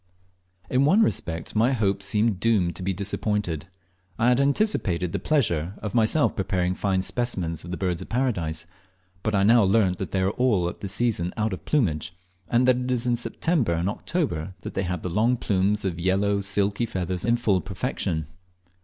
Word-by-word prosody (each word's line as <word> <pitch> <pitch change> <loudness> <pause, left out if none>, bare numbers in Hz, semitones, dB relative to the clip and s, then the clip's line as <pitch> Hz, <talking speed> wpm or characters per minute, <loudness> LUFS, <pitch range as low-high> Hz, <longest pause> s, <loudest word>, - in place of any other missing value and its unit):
In 130 +1 +2
one 190 +10 +5
respect 80 - -2
my 115 +5 +3
hopes 100 -4 0
seemed 105 -1 +1
doomed 100 -6 +2
to - - -8
be 95 +1 -1
disappointed. 100 -3 -2 0.5
I 115 +2 +3
had 125 +2 +3
anticipated 140 - +1
the - - -2
pleasure 95 - 0
of 105 - -5
myself 120 +6 +3
preparing 90 -2 0
fine 95 -1 0
specimens 90 -9 -2
of 85 - -9
the 90 - -4
Birds 90 -3 -1
of - - -9
Paradise, 90 -11 -1 0.6
but 110 +1 -1
I 100 - +3
now 115 +3 +6
learnt 95 -2 +2
that 95 - -3
they 95 - 0
are 95 +1 +2
all 105 -8 +1
at - - -10
this 100 - -2
season 105 -8 0
out 110 -1 0
of 95 - -7
plumage, 85 - 0 0.3
and 120 +2 +3
that 130 -1 +5
it 125 0 -3
is 125 -1 +1
in 120 -1 +2
September 125 - 0
and 85 +2 -1
October 100 - -2
that - - -7
they 95 - -1
have 90 -1 -3
the - - -2
long 115 +7 +2
plumes 100 0 0
of 90 -3 -2
yellow 100 +3 +1
silky 100 +3 0
feathers 90 -2 -3
in 120 0 +2
full 100 -6 +1
perfection. 80 -4 -3
100 Hz, 190 wpm, -25 LUFS, 90-120 Hz, 0.6 s, now